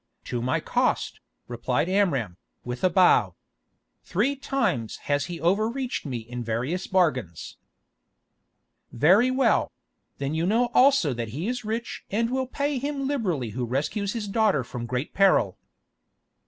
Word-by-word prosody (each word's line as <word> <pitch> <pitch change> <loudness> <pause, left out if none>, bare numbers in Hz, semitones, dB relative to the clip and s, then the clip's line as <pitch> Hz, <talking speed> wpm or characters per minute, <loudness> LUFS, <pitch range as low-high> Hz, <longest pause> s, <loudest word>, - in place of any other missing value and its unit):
"To 120 - -3
my 130 +2 0
cost," - - 0 0.3
replied 125 +5 -1
Amram, 140 - 0 0.3
with 125 0 -6
a 185 - +5
bow. 175 - +4 0.7
"Three 240 +10 0
times 265 - -1
has 145 -1 +1
he 175 -1 -6
overreached 220 - 0
me 130 -3 -3
in 120 +2 -6
various 125 +11 -2
bargains." 130 - 0 1.3
"Very 185 - +4
well; 260 +1 +2 0.5
then 140 +1 -3
you 165 +2 0
know 235 +4 +2
also 260 - +4
that 120 -1 -4
he 170 +7 -2
is 245 0 -3
rich 225 +2 -4
and 230 +4 0
will 260 0 -1
pay 285 +1 -1
him 280 0 -3
liberally 185 - -1
who 125 +3 -3
rescues 150 - -2
his 225 -3 -4
daughter 200 - +2
from 120 0 -6
great 125 +4 -3
peril." 190 - +3
180 Hz, 140 wpm, -25 LUFS, -, 1.3 s, a